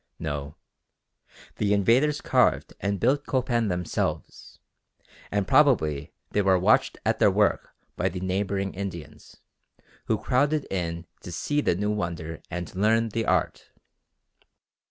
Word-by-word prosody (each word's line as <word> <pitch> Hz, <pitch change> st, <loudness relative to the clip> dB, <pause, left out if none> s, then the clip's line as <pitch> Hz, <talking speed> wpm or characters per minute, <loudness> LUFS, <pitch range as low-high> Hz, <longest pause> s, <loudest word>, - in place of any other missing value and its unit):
No; 75 Hz, -1 st, -5 dB, 1.0 s
the 105 Hz, -1 st, +1 dB
invaders 125 Hz, +9 st, +2 dB
carved -, -, +2 dB
and 100 Hz, 0 st, -1 dB
built 140 Hz, +9 st, +1 dB
Copan 125 Hz, -4 st, 0 dB
themselves, 90 Hz, -2 st, -3 dB, 0.7 s
and 100 Hz, -2 st, -1 dB
probably 80 Hz, -, +3 dB, 0.2 s
they 105 Hz, -, +2 dB
were 95 Hz, -1 st, +4 dB
watched 100 Hz, +5 st, +3 dB
at -, -, +1 dB
their -, -, +6 dB
work -, -, +1 dB, 0.3 s
by 95 Hz, -, +1 dB
the 90 Hz, +1 st, -6 dB
neighbouring 95 Hz, +1 st, -2 dB
Indians 85 Hz, -6 st, -8 dB, 0.7 s
who -, -, +1 dB
crowded 145 Hz, +3 st, +1 dB
in 85 Hz, -2 st, -3 dB, 0.2 s
to 90 Hz, -, -8 dB
see 145 Hz, -, -1 dB
the 90 Hz, -, +1 dB
new 105 Hz, +3 st, -1 dB
wonder 85 Hz, -5 st, -4 dB
and 90 Hz, -1 st, -5 dB
learn 110 Hz, +4 st, +2 dB
the 110 Hz, +1 st, -2 dB
art. -, -, 0 dB
100 Hz, 130 wpm, -26 LUFS, 85-115 Hz, 1.0 s, their